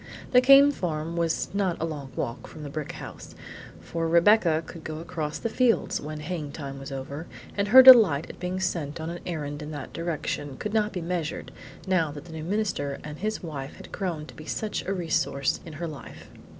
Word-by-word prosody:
The 250 - +7
Came 275 +2 +8
farm 165 - -3
was 165 -1 0
not 195 -4 0
a 165 - 0
long 145 -5 -6
walk 120 0 -4
from 155 - -10
the 145 - -6
brick 155 -1 -4
house, - - -9 0.4
for 165 -1 -3
Rebecca 170 -1 +4
could 165 -2 -10
go 155 -1 -5
across 160 -2 -4
the - - -2
fields 235 +1 +1
when 150 +1 -6
haying 150 -3 -4
time 135 -3 -6
was 135 +1 -8
over, 140 +4 -6 0.3
and 200 0 0
her 260 +5 +10
delight 220 - +9
at - - -11
being 180 +1 -3
sent 165 -5 -2
on 160 +1 -4
an 175 - -6
errand 145 -3 -4
in 150 - -6
that 145 -3 -7
direction 155 -4 -3
could 210 - -4
not 215 -1 +2
be 180 - -4
measured, 170 -2 -3 0.3
now 180 -5 +2
that 145 0 -9
the 165 - -11
new 160 -1 -6
minister 180 -7 -1
and 150 0 -8
his 215 0 -2
wife 145 -4 -6
had - - -12
grown 170 -6 -3
to - - -12
be 155 - -11
such 215 -2 -3
a - - 0
resource 160 -6 0
in 160 - -8
her 170 +3 -4
life. 150 -4 -10
165 Hz, 210 wpm, -26 LUFS, 150-185 Hz, 0.4 s, her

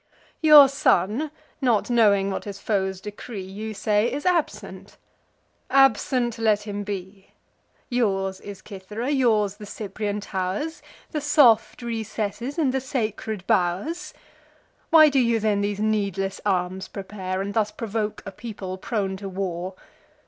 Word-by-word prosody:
Your 300 -3 +9
son, 270 - +1 0.3
not 245 -3 +2
knowing 200 -4 +4
what - - -4
his 200 -1 -7
foes 190 -3 -1
decree, 210 0 -7
You 210 +3 -6
say, 210 +3 +1
is 285 +3 -4
absent: 210 - -2 0.7
absent 250 -2 +3
let 215 -2 +2
him 205 -1 -4
be. 195 -1 -7 0.5
Yours 195 -6 0
is 200 -1 -9
Cythera, 210 +6 -5
yours 215 -7 +2
the 210 -1 -10
Cyprian 205 0 -4
tow'rs, 200 - -3 0.3
The 300 - -2
soft 255 -6 +4
recesses, 225 - -4
and 285 -6 +1
the 265 - 0
sacred 220 -6 -3
bow'rs. 185 - 0 0.7
Why 315 -1 +8
do 275 -1 +2
you 235 -2 +2
then 210 -2 +1
these 205 0 -2
needless 200 -3 -1
arms 185 0 -1
prepare, 190 -1 -5
And 200 +1 -3
thus 215 -1 +1
provoke 215 -1 -3
a 195 - -6
people 195 -3 -7
prone 195 -3 -2
to 195 0 -6
war? 185 -1 -4
210 Hz, 135 wpm, -24 LUFS, 195-235 Hz, 0.7 s, Your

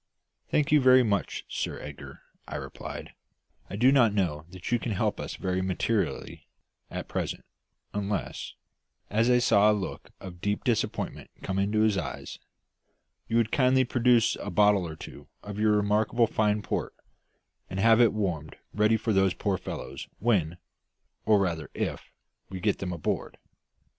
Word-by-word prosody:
"Thank 150 -1 +1
you 150 -1 +6
very 130 0 +7
much, 100 -4 -1
Sir - - -3
Edgar," 75 -1 -10 0.2
I - - -6
replied. - - -7 0.6
"I - - -5
do 125 +6 +5
not 120 -7 +4
know 80 -6 -1
that 90 +3 -7
you 120 - +3
can 115 - -3
help 95 - -1
us - - -5
very 95 0 -1
materially 95 +3 -2 0.4
at - - -5
present, - - -3 0.5
unless," 100 -1 -3 0.6
as 115 +3 +2
I 125 - +5
saw 105 -3 +5
a 105 - +1
look 95 - -6
of 90 -2 -10
deep 105 0 -1
disappointment 120 -4 -2
come 95 0 -1
into 105 +2 +1
his 110 -3 +3
eyes 75 - -6 0.9
"you 115 - +1
would 115 -2 +2
kindly 130 -1 +4
produce 120 -2 +3
a - - -5
bottle 105 -4 +3
or 80 - -7
two - - -11 0.2
of 105 0 -6
your 105 0 +4
remarkably 105 +3 +2
fine 105 -1 0
port, - - -3 0.7
and 95 - -4
have 115 +2 +6
it 115 - +6
warmed 90 -8 -3 0.2
ready 105 +1 +3
for 110 0 -1
those 95 -1 +3
poor 100 -4 -1
fellows - - -7
when 90 -7 +1 0.7
or 105 -2 +5
rather 85 -5 -1
if - - -3 0.4
we 95 - -6
get 105 +2 0
them 95 -2 -3
on 85 -2 -6
board. - - -2
105 Hz, 165 wpm, -28 LUFS, 95-115 Hz, 0.9 s, very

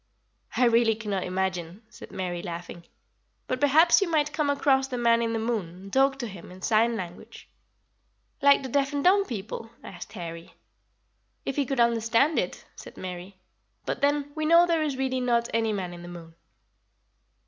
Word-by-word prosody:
"I 250 - +4
really 230 -1 +4
cannot 205 -4 -3
imagine," 185 +1 -3
said - - -13
Mary, 175 -2 -4
laughing; 170 -1 -7 0.6
"but 255 - -2
perhaps 315 +7 +5
you 390 - +1
might 300 -2 +1
come 300 -2 0
across 270 -1 +2
the 255 -2 -4
Man 235 -1 +3
in 230 -1 0
the 225 - -1
Moon 225 -5 -1
and 185 +3 -13
talk 270 0 +3
to 245 -3 -4
him 185 -4 -11
in 185 0 -13
sign 230 +1 +3
language." 180 -4 -8 0.9
"Like 280 0 +5
the 260 - -5
deaf 275 +2 0
and 285 -1 -1
dumb 395 +2 +4
people?" 225 - -6
asked 175 +2 -10
Harry. 170 -4 -8 0.9
"If 270 - -2
he 285 -3 0
could 270 -1 -2
understand 235 +5 +3
it," - - -4
said - - -12
Mary; 185 +1 -7 0.5
"but - - -3
then, 290 0 +1
we 310 - -4
know 335 +3 +6
there 335 -2 +1
is 290 -4 -1
really 260 -1 -1
not 235 -1 +1
any 225 -1 +1
Man 185 -4 -4
in 175 - -10
the 175 - -10
Moon." 170 -2 -10
230 Hz, 180 wpm, -26 LUFS, 185-275 Hz, 0.9 s, know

